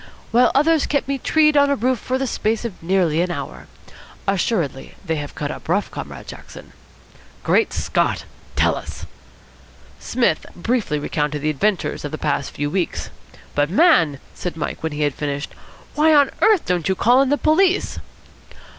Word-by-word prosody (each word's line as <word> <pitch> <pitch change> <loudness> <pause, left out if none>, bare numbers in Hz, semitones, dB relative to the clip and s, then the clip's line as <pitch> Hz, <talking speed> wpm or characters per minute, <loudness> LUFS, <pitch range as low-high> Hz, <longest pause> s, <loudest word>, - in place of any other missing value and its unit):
"While 245 +2 +5
others 310 +2 +3
kept 285 -2 0
me 275 -1 -1
tree'd 305 +1 +3
on 285 0 +5
top 280 0 +1
of 230 - -10
a - - +1
roof 255 -2 +2
for 255 +4 -2
the 270 - -1
space 225 -1 -1
of 215 -6 -6
nearly 170 -2 +2
an 180 - 0
hour. 175 - -6 0.6
Assuredly 180 - -1
they 160 -2 -1
have 145 -1 -6
cut 145 0 -3
up - - -9
rough, 200 +4 +1
Comrade - - -7
Jackson." - - -11 0.7
"Great - - +2
Scott! - - 0 0.3
Tell - - +3
us." - - -8 0.9
Psmith 235 -11 0
briefly 210 -4 -1
recounted 150 0 -2
the 155 - +2
adventures 190 +6 -1
of 145 - -4
the 155 - -4
past 145 -2 -1
few 145 0 -3
weeks. 185 -3 -2 0.4
"But, 145 +1 +1
man," 175 - +4
said 180 -2 -5
Mike, 155 - -4
when 160 -1 -3
he 150 +1 -1
had 145 -2 +1
finished 145 0 -4 0.4
"why 310 +1 +4
on 285 -2 +5
earth 430 -5 +4
don't 180 -1 0
you 190 - +2
call 245 +7 +4
in 275 - +2
the 290 - +2
police?" 360 +6 +2
190 Hz, 180 wpm, -21 LUFS, -, 0.9 s, While